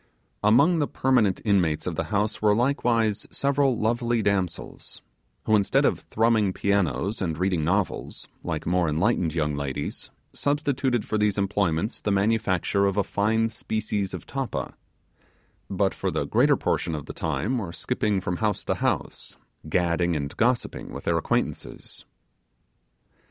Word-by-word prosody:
Among 140 +11 +5
the 145 - +1
permanent 120 -8 +2
inmates 90 -8 +2
of - - -2
the - - -2
house 105 +1 -1
were 105 -1 +4
likewise 115 -4 +1
several 140 -3 +1
lovely 120 0 0
damsels, 95 -4 -2 0.4
who 110 - +3
instead 100 -2 +3
of - - +2
thrumming 110 -3 +1
pianos 100 - 0
and 80 -4 -1
reading 90 -2 0
novels, 95 +5 -1 0.2
like 80 -2 -3
more 85 -1 +1
enlightened 85 0 +1
young 75 -2 0
ladies, 70 -2 -4 0.2
substituted 140 -4 0
for 110 - -1
these 105 -1 +1
employments 100 -1 0
the - - -1
manufacture 100 -1 +1
of 100 0 -1
a 100 - +3
fine 110 +3 +1
species 105 -3 -3
of - - -9
tappa; 135 -2 -4 1.0
but 95 0 +1
for - - -2
the - - -1
greater - - +3
portion 80 - -1
of 75 -2 -6
the - - -7
time 125 +4 -1
were 95 -6 -5
skipping 100 +3 -1
from 90 -1 -3
house 105 -2 -1
to - - +1
house, - - -2 0.3
gadding 85 0 +1
and 70 -1 -3
gossiping 120 +1 0
with - - -7
their - - +1
acquaintances. - - -3
100 Hz, 145 wpm, -25 LUFS, 90-115 Hz, 1.0 s, Among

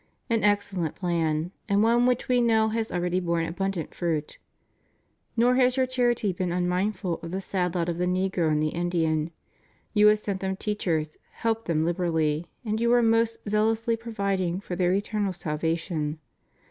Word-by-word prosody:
An 225 -1 +2
excellent 200 -5 +1
plan, 165 -2 -1 0.2
and 200 +1 +3
one 240 +2 +4
which 250 -1 +1
We 250 -1 +3
know 220 -2 +3
has 225 0 -2
already 180 +1 0
borne 170 -2 0
abundant 180 0 -3
fruit. 160 -4 -2 1.0
Nor 245 +2 +4
has 255 0 +3
your 260 - +3
charity 240 -5 +1
been 180 0 -2
unmindful 180 +1 -1
of 165 - -6
the 185 +3 -3
sad 185 -2 -2
lot 170 -1 0
of 170 -1 -2
the 180 - +1
negro 185 -2 +1
and 150 0 +1
the 155 - +1
Indian 165 -2 0 0.3
— - - -38
you 210 -1 +6
have 210 0 +6
sent 200 -2 -4
them 190 0 -2
teachers, 170 -7 -2
helped 225 0 -1
them 160 -2 +1
liberally, 165 -2 0 0.2
and 215 +1 -1
you 235 0 +3
are 240 -1 +5
most 225 0 +1
zealously 225 +2 +1
providing 200 -6 -2
for 185 -2 -5
their 180 0 +2
eternal 205 0 0
salva 160 -1 -1
tion. 160 -3 -3
185 Hz, 175 wpm, -26 LUFS, 170-220 Hz, 1.0 s, you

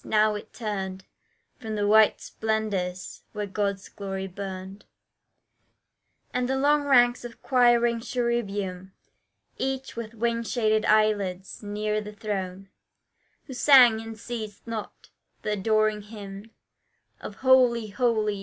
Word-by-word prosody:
Now 215 0 +3
it 210 - -7
turned 195 -4 -5 0.5
From 220 -3 -5
the 205 -1 0
white 215 +1 +5
splendours 205 -5 -3
where 210 -1 -3
God's 200 -1 -2
glory 195 -1 -5
burned, 190 +1 -7 1.5
And 250 -1 -1
the 265 - +1
long 290 +1 +3
ranks 245 -3 +4
of 240 -1 -10
quiring 240 -2 +3
cherubim 205 -6 -2 0.7
Each 270 0 -3
with 230 -1 -6
wing 230 +1 0
shaded 220 -2 +1
eyelids, 205 -4 +1
near 210 +1 -2
the 210 0 -8
throne, 195 -2 -5 0.8
Who 265 - -8
sang 245 -4 +6
and 225 0 -8
ceased 215 -3 -7
not 225 -2 -7 0.3
the 210 - -1
adoring 215 +1 +1
hymn 205 0 -10 0.7
Of 205 - -8
Holy, 245 -4 +4
Holy! 215 -2 0
215 Hz, 120 wpm, -26 LUFS, 200-235 Hz, 1.5 s, sang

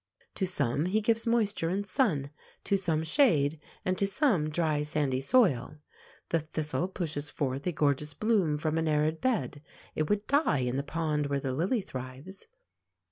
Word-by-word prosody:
To 190 - -1
some 150 -3 0
he 205 +4 +2
gives 225 +2 +1
moisture 215 -7 +1
and 195 +3 -1
sun, 165 - +1 0.3
to 200 - +1
some 165 -5 +1
shade, 160 - +3 0.3
and 185 0 0
to 200 - +2
some 195 - +2
dry, 155 -2 0
sandy 145 -3 0
soil. 150 - +2 0.5
The 165 - +2
thistle 155 0 -2
pushes 155 -6 -3
forth 140 +1 -3
a - - +2
gorgeous 145 -1 0
bloom 195 -7 +1
from 155 +1 -1
an 160 - 0
arid 155 +1 +1
bed. 145 - -1 0.3
It 155 -1 -1
would 210 0 0
die 280 - +2
in 125 0 -1
the - - +1
pond 150 0 -1
where 140 0 -1
the 135 -1 -3
lily 185 - 0
thrives. 130 - -8
155 Hz, 170 wpm, -29 LUFS, 145-195 Hz, 0.5 s, shade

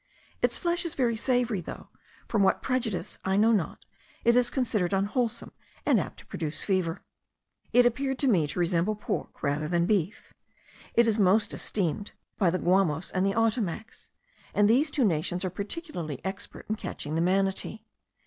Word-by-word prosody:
Its - - +2
flesh 345 0 0
is 340 - -4
very 240 -4 +1
savoury, 245 -3 0
though, - - -9 0.4
from 215 - +1
what 190 - +3
prejudice 250 -7 -2
I 190 +1 +1
know 220 +2 +5
not, 200 -8 -1 0.4
it 235 0 +5
is 250 -1 +4
considered 215 -9 0
unwholesome 210 +5 -1 0.3
and - - +4
apt - - -5
to - - -13
produce 155 -2 -4
fever. 185 -4 0 0.7
It 245 0 +6
appeared 265 +2 +1
to 275 - +1
me 175 - +3
to - - -6
resemble 175 +4 +1
pork 210 +1 -5
rather 145 +2 0
than 170 +1 +2
beef. 195 -2 -1 0.6
It 235 0 +5
is 220 -1 +2
most 200 +2 +3
esteemed 200 0 -2 0.3
by 190 -5 +4
the 180 - 0
Guamos 180 -3 +1
and 185 - 0
the 195 0 +1
Ottomacs; 225 -2 -1 0.5
and 205 0 +5
these 265 +8 +4
two 275 -3 +1
nations 175 +1 0
are 185 - -2
particularly 200 - -5
expert 190 +1 -5
in 215 - -1
catching 150 -6 -5
the 165 - +1
manatee. 195 +4 0
205 Hz, 170 wpm, -28 LUFS, 180-235 Hz, 0.7 s, It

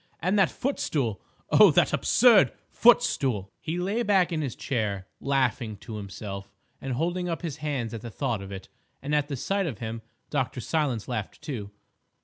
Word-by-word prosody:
And 185 +5 +1
that 190 - +5
footstool! 140 - -2 0.3
Oh, - - +8
that - - +3
absurd 235 -5 +5 0.2
footstool!" 135 - +3
He 165 +2 -3
lay 195 +6 0
back 195 -6 +3
in 160 -2 -1
his 135 -5 -3
chair, 105 -8 -2
laughing 130 -5 0
to 110 +2 -8
himself 100 0 -7 0.3
and 135 -1 -3
holding 175 +6 -1
up 165 +1 -3
his 160 -5 -4
hands 135 -7 -3
at 115 - -5
the 120 - -7
thought 120 -3 -2
of 100 0 -8
it, 95 -1 -7 0.4
and 145 +2 -2
at 150 -1 +2
the 145 - -3
sight 195 +8 0
of 130 -9 -4
him 115 -1 -5 0.3
Dr. - - -1
Silence 140 -9 -1
laughed, 105 -3 -4
too. 110 -9 -5
135 Hz, 175 wpm, -27 LUFS, 110-170 Hz, 0.4 s, Oh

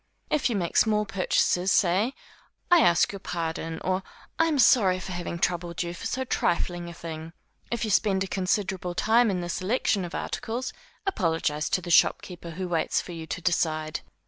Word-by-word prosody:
If 300 -4 +2
you 235 - -1
make 175 -4 -1
small 210 -1 +3
purchases, 185 -1 +1
say, 195 +8 +2 0.6
I 350 - +8
ask 170 - +4
your 200 - -7
pardon, 165 -2 -3
or 185 0 0 0.4
I 325 - +4
am 310 -3 +1
sorry 195 -8 +5
for 185 - -7
having 175 -1 -4
troubled 175 0 -1
you 170 0 -4
for 175 - -5
so 260 - -2
trifling 175 -6 -1
a - - -8
thing. 160 0 -7 0.4
If 235 -1 -1
you 215 - -2
spend 195 -1 +2
a - - -4
considerable 185 -1 -1
time 225 +4 +4
in 185 -3 -1
the 175 - -4
selection 195 +2 0
of 175 - -6
articles, 245 +2 -3 0.3
apologize 165 - 0
to 185 - +1
the 175 - -4
shopkeeper 175 0 +2
who 180 +3 -4
waits 165 -2 0
for - - -7
you 165 -2 -7
to 160 +3 -4
decide. 155 -3 0
180 Hz, 185 wpm, -26 LUFS, 170-210 Hz, 0.6 s, I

